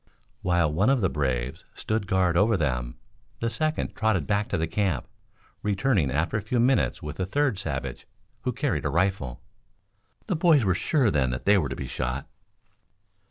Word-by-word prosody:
While 85 -4 +2
one 100 +9 +3
of 135 -3 +3
the 95 - +1
braves 65 -4 -2
stood 110 -2 -2
guard 90 -2 +2
over 105 +4 +4
them, 60 -6 -2 0.4
the 115 0 -1
second 155 +6 -1
trotted 110 -9 +1
back 105 0 0
to - - -1
the 80 - 0
camp, 80 -4 -1 0.5
returning 100 - +1
after 80 +10 0
a - - -2
few 115 +4 -1
minutes 125 +3 +2
with 75 +3 -6
a 95 - +1
third 135 -2 +1
savage 75 -8 -4 0.3
who - - -1
carried - - -1
a - - +1
rifle. 85 -8 -1 0.8
The - - -1
boys 155 -7 +4
were 95 - +3
sure 120 - +2
then 65 -4 +2
that 60 +1 -4
they 100 0 +5
were 75 -6 -1
to 65 - -4
be - - -5
shot. 65 +2 -3
95 Hz, 180 wpm, -26 LUFS, 75-110 Hz, 0.8 s, they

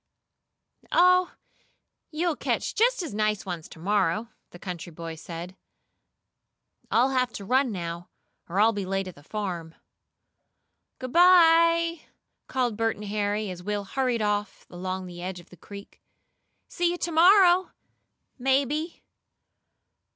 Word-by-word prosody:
"Oh, 365 +1 +4 0.7
you'll 330 +1 -1
catch - - -2
just 475 -2 +2
as 320 - -6
nice 215 -1 -1
ones 175 -4 -6
to - - -13
morrow," 195 +3 0 0.2
the - - -13
country 175 -1 -7
boy 165 0 -7
said. 170 +3 -8 1.3
"I'll 255 +3 +3
have 255 -2 +1
to 200 - -7
run 260 +3 +2
now, 170 -2 -6 0.4
or 185 +4 -1
I'll 225 +2 +5
be 205 -2 -3
late 195 0 -2
at 185 - -8
the 145 - -17
farm." 175 -2 -5 1.2
"Good 255 -1 -7
bye!" 335 -1 +5 0.5
called 245 -5 -1
Bert 225 0 0
and 210 - -9
Harry 205 0 -2
as 180 -1 -8
Will 205 +2 -3
hurried 245 +1 -1
off 205 -1 -2
along 185 +1 -5
the 175 -1 -9
edge 180 0 -5
of 175 - -18
the - - -13
creek. 200 +4 -12 0.7
"See 350 -1 0
you 350 - -2
to 345 - -3
morrow, 360 +2 +5 0.7
maybe." 280 +5 0
210 Hz, 135 wpm, -26 LUFS, -, 1.3 s, I'll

